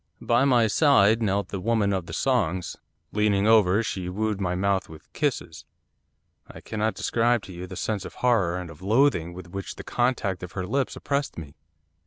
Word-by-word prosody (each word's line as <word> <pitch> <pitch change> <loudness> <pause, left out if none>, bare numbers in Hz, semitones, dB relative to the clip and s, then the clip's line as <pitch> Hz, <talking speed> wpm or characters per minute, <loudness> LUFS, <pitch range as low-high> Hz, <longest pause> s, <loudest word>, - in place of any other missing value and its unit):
By 120 +3 +2
my 125 -4 +4
side 110 -3 +4
knelt 100 -2 0
the 95 - -4
Woman 105 0 +1
of 95 -3 -3
the - - -8
Songs. 95 -10 0 0.4
Leaning 105 -1 +2
over, 110 -1 +4
she 95 -5 -4
wooed 105 +1 -2
my 90 -1 -1
mouth 95 +1 0
with 80 -1 -14
kisses. - - -2 0.8
I - - -11
cannot 110 0 -2
describe 120 -1 +1
to 95 - -10
you 90 +1 -7
the 95 - -8
sense 105 +1 -2
of - - -9
horror 100 -9 +1
and 90 -2 -6
of 75 - -15
loathing 105 - +2
with 85 0 -10
which 95 0 -6
the - - -9
contact 120 -7 -1
of 90 - -8
her 95 -2 -3
lips 135 +7 -1
oppressed 140 0 -2
me. 75 -4 -8
100 Hz, 190 wpm, -25 LUFS, 90-115 Hz, 0.8 s, my